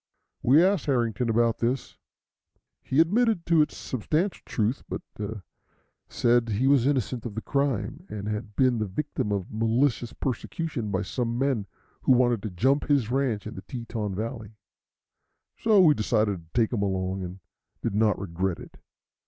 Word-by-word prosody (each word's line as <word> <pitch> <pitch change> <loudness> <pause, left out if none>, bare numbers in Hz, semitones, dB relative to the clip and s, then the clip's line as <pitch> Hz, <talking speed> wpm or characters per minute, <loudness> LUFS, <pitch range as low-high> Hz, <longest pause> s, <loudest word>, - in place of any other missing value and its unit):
We 145 +7 +6
asked 195 -5 +1
Harrington 120 -3 +1
about 115 0 +2
this. 120 +3 -1 0.9
He 135 - 0
admitted 210 +3 +3
its 160 -3 +3
substantial 155 - -1
truth, 110 +3 0
but - - -4 1.1
said 120 -1 +2
he 110 +5 0
was 135 -2 +4
innocent 130 -4 0
of 115 -4 -6
the 110 - -3
crime, 140 - -1
and 105 -1 -5
had 105 -1 -4
been 130 -3 +3
the 110 - -1
victim 125 +1 -3
of 100 -3 -2
malicious 115 +2 +1
persecution 130 -1 -3
by 100 0 -1
some 120 +3 -2
men 130 -6 0 0.3
who 130 - +4
wanted 120 -3 +3
to 110 - -4
"jump" 130 +11 +1
his 135 -6 +2
ranch 125 -6 0
in 110 - -6
the 95 - -8
Teton 115 -5 -5
valley; 110 0 -5 1.0
so 220 -3 +4
we 165 -5 +7
decided 105 -5 +1
to 80 0 -21
take 115 +1 +2
him 110 - 0
along, 95 -1 -1
and 90 +1 -6 0.4
did 115 - -1
not 105 0 +3
regret 95 -1 -2
it. - - -12
120 Hz, 160 wpm, -26 LUFS, 105-135 Hz, 1.1 s, we